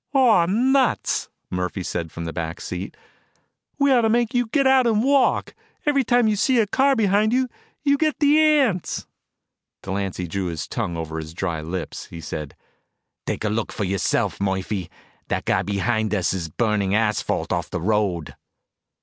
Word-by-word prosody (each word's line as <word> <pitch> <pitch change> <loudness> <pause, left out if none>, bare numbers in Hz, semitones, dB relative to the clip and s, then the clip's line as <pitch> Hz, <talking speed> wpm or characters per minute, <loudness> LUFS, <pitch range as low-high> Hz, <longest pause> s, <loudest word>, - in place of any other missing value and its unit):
"Aw 230 -10 +5
nuts!" 255 +6 +1 0.2
Murphy 90 +1 -2
said 85 -2 -4
from 85 - -6
the 80 - -4
back 85 0 -4
seat. 90 +2 -6 0.8
"We 280 -1 +3
ought 250 -2 +5
to 225 - +2
make 235 +2 +1
you 245 -1 +1
get 275 +4 +1
out 265 -2 +5
and 220 -1 +2
walk. 275 0 +2 0.3
Every 285 -2 +3
time 245 -1 +3
you 215 - +2
see 250 +4 +2
a 220 - +4
car 270 +6 +2
behind 215 0 +2
you, 260 0 +2 0.4
you 280 -1 +3
get 310 -2 +1
the 295 0 +4
ants." 275 - +2 0.8
Delancy 95 -1 -3
drew 95 +3 -3
his 80 -3 -4
tongue 85 -1 -3
over 80 0 -4
dry 80 +1 -4
lips. 85 +3 -5
He 85 - -9
said, 75 -3 -6 0.7
"Take - - -2
a 110 - +1
look 110 +1 -2
for - - -3
yourself, 95 0 0
Murphy. 95 -2 -2 0.4
That - - -2
guy - - +2
behind 105 +3 -1
is 90 -3 -1
burning 105 +1 0
asphalt 110 -1 0
off - - -2
the - - -3
road." 95 -4 0
110 Hz, 165 wpm, -23 LUFS, -, 0.8 s, Aw